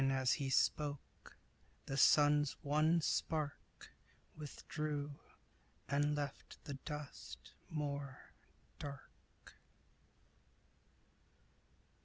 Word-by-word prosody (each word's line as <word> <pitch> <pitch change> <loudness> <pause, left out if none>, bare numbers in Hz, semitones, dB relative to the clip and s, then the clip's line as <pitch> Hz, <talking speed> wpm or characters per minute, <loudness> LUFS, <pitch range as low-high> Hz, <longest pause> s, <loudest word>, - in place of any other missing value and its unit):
Even 135 0 +3
as 130 -1 +3
he 140 -3 -1
spoke, 145 +1 0 0.5
the 135 - -3
sun's 145 +1 +6
one 155 +4 +4
spark 150 -3 -2 0.4
Withdrew, 150 -1 -3 0.8
and 145 +2 +2
left 145 -2 -4
the 145 - -5
dust 140 - -7 0.2
more 140 -3 -3 0.6
dark. 140 -2 -10
145 Hz, 75 wpm, -38 LUFS, 140-150 Hz, 0.8 s, sun's